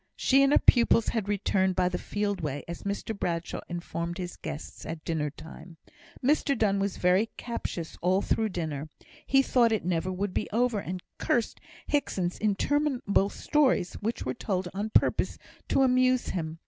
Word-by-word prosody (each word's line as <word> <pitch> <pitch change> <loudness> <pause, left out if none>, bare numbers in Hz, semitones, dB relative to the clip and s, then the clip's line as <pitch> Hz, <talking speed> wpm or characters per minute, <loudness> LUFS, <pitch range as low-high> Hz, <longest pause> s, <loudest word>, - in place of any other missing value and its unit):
She 270 +1 +4
and 275 0 +4
her - - +6
pupils 235 -2 +4
had 215 -4 -2
returned 190 -2 +1
by 180 0 +2
the 180 0 -2
field 205 -1 -2
way, 145 -2 -3
as 170 0 -6
Mr 200 +2 -3
Bradshaw 170 -3 -3
informed 170 0 -4
his 180 -2 -5
guests 150 - -7
at 160 -1 -6
dinner 155 -3 -1
time. 160 +3 -12 0.5
Mr 280 -1 +2
Donne 200 -3 +2
was 195 -1 -1
very 185 +5 +3
captious 180 -8 -5
all 185 +3 +2
through 220 -1 +1
dinner. 155 -5 -4 0.4
He 270 0 +5
thought 240 -3 +3
it 220 - 0
would 175 - -2
never 185 +4 -1
be 185 - -3
over, 235 0 +1
and 185 -2 -5 0.2
cursed 235 -2 0 0.3
Hickson's 185 -11 -1
interminable 215 -1 +1
stories, 265 -12 +1
which 225 +3 -2
were - - -1
told 190 -6 -2
on 205 +3 -3
purpose - - +2 0.3
to 270 - +3
amuse 255 -1 +3
him. 160 -3 -3
195 Hz, 170 wpm, -28 LUFS, 175-235 Hz, 0.5 s, her